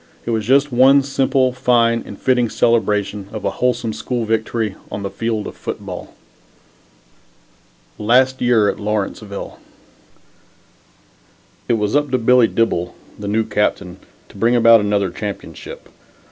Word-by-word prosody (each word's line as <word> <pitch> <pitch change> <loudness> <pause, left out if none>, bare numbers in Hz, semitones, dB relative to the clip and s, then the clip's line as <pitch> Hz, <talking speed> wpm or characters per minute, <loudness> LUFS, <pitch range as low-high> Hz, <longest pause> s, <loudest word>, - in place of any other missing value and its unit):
It 120 - -2
was 110 -2 -2
just 140 +2 +3
one 135 +3 +5
simple, 135 -1 +1
fine 120 -2 +2
and 100 - -10
fitting 125 -3 +1
celebration 105 -4 0
of 110 - -6
a - - +1
wholesome 125 -3 -1
school 120 +2 -3
victory 110 -1 -1 0.2
on 100 - -5
the 100 - -4
field 110 +1 -3
of - - -8
football. - - -7 1.8
LAST 130 +4 +2
YEAR 120 -4 +3
AT - - -2
LAWRENCEVILLE 105 -1 -4 2.1
It - - +3
was 105 +1 0
up 145 0 +1
to 130 - +1
Billy 125 0 +4
Dibble, 90 -7 -1 0.2
the 100 - -6
new 110 +2 +1
captain, 95 -4 -2 0.3
to - - -15
bring 115 +4 +2
about 115 -1 +6
another 100 -2 0
championship. 105 +1 -8
115 Hz, 135 wpm, -19 LUFS, 105-125 Hz, 2.1 s, about